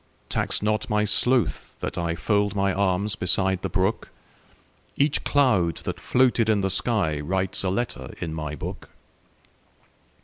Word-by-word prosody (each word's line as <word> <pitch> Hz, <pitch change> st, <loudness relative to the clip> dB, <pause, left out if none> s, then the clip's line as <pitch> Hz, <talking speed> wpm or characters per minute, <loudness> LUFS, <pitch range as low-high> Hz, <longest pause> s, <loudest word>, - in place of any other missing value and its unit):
Tax -, -, 0 dB
not 105 Hz, +2 st, 0 dB
my 105 Hz, -1 st, +2 dB
sloth 120 Hz, +3 st, 0 dB
that -, -, -4 dB
IFold 100 Hz, +4 st, 0 dB
my 100 Hz, -1 st, +1 dB
arms 100 Hz, +1 st, +1 dB
beside 95 Hz, +1 st, +1 dB
the -, -, -3 dB
brook; 95 Hz, +3 st, -1 dB, 0.9 s
Each 145 Hz, +1 st, +1 dB
cloud 105 Hz, -, +2 dB
that -, -, -4 dB
floated 125 Hz, -3 st, +2 dB
in 105 Hz, -2 st, +3 dB
the 95 Hz, -, 0 dB
skyWrites 95 Hz, -3 st, 0 dB
a 95 Hz, -, 0 dB
letter 120 Hz, +6 st, -3 dB
in 80 Hz, -2 st, -4 dB
my 75 Hz, -1 st, -4 dB
book. -, -, -7 dB
100 Hz, 135 wpm, -24 LUFS, 90-110 Hz, 0.9 s, in